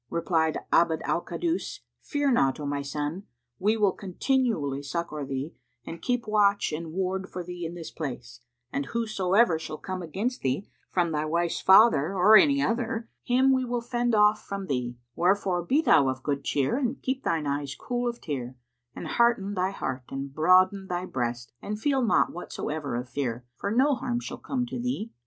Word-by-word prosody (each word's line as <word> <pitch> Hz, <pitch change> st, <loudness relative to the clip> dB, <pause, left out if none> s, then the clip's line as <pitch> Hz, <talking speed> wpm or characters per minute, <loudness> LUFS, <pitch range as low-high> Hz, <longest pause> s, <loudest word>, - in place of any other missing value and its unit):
Replied 165 Hz, -2 st, +1 dB, 0.2 s
Abd 165 Hz, -1 st, +3 dB
al -, -, 0 dB
Kaddus, 345 Hz, 0 st, -3 dB, 0.2 s
"Fear 290 Hz, -2 st, 0 dB
not, 135 Hz, -, +2 dB
O 150 Hz, -, -4 dB
my 140 Hz, 0 st, -2 dB
son; 150 Hz, +7 st, -4 dB, 0.3 s
we 215 Hz, +3 st, +2 dB
will 205 Hz, -3 st, +3 dB
continually 195 Hz, -, -1 dB
succour 150 Hz, 0 st, -4 dB
thee 135 Hz, +3 st, -4 dB, 0.3 s
and 165 Hz, -, -8 dB
keep 245 Hz, -2 st, -1 dB
watch 205 Hz, -3 st, +2 dB
and 160 Hz, +1 st, -4 dB
ward 190 Hz, +2 st, -2 dB
for 180 Hz, -, -5 dB
thee 175 Hz, -1 st, -5 dB
in 170 Hz, -, -8 dB
this 165 Hz, -2 st, -7 dB
place; 120 Hz, -5 st, -6 dB, 0.3 s
and 140 Hz, 0 st, -2 dB
whosoever 215 Hz, -4 st, +2 dB
shall 155 Hz, -1 st, -6 dB
come 185 Hz, +2 st, -5 dB
against 205 Hz, +10 st, -3 dB
thee 135 Hz, +9 st, -1 dB, 0.2 s
from 175 Hz, -2 st, +1 dB
thy 150 Hz, -1 st, 0 dB
wife's 170 Hz, +2 st, 0 dB
father 190 Hz, -4 st, +6 dB
or 205 Hz, +4 st, +7 dB
any 280 Hz, +4 st, +6 dB
other, 230 Hz, -1 st, -1 dB
him 260 Hz, +2 st, +3 dB
we 260 Hz, -1 st, +1 dB
will 245 Hz, -1 st, -1 dB
fend 240 Hz, 0 st, 0 dB
off 210 Hz, 0 st, +4 dB
from 195 Hz, -1 st, -5 dB
thee; 125 Hz, -6 st, -2 dB, 0.2 s
wherefore 185 Hz, 0 st, +2 dB
be 280 Hz, -, +2 dB
thou 140 Hz, -, +5 dB
of 130 Hz, 0 st, -4 dB
good 140 Hz, -1 st, -1 dB
cheer 140 Hz, -, 0 dB
and 260 Hz, -1 st, -2 dB
keep 260 Hz, +1 st, -1 dB
thine 160 Hz, -2 st, 0 dB
eyes 140 Hz, -1 st, -2 dB
cool 245 Hz, -1 st, -2 dB
of 235 Hz, -, -6 dB
tear, 130 Hz, -4 st, -5 dB, 0.4 s
and -, -, -6 dB
hearten 230 Hz, -4 st, +2 dB
thy 185 Hz, -1 st, 0 dB
heart 130 Hz, -9 st, -4 dB
and 135 Hz, 0 st, -5 dB
broaden 185 Hz, +5 st, +4 dB
thy 180 Hz, 0 st, -2 dB
breast 120 Hz, -5 st, -3 dB
and 210 Hz, +1 st, -4 dB
feel 270 Hz, +2 st, +1 dB
naught 235 Hz, -, +3 dB
whatsoever 150 Hz, -5 st, -4 dB
of 125 Hz, +1 st, -3 dB
fear, 125 Hz, -2 st, -3 dB
for 200 Hz, -, -3 dB
no 265 Hz, +7 st, +3 dB
harm 245 Hz, -2 st, -2 dB
shall -, -, -7 dB
come 250 Hz, -2 st, -2 dB
to 245 Hz, 0 st, -5 dB
thee." 240 Hz, -2 st, -3 dB
185 Hz, 185 wpm, -27 LUFS, 145-230 Hz, 0.4 s, or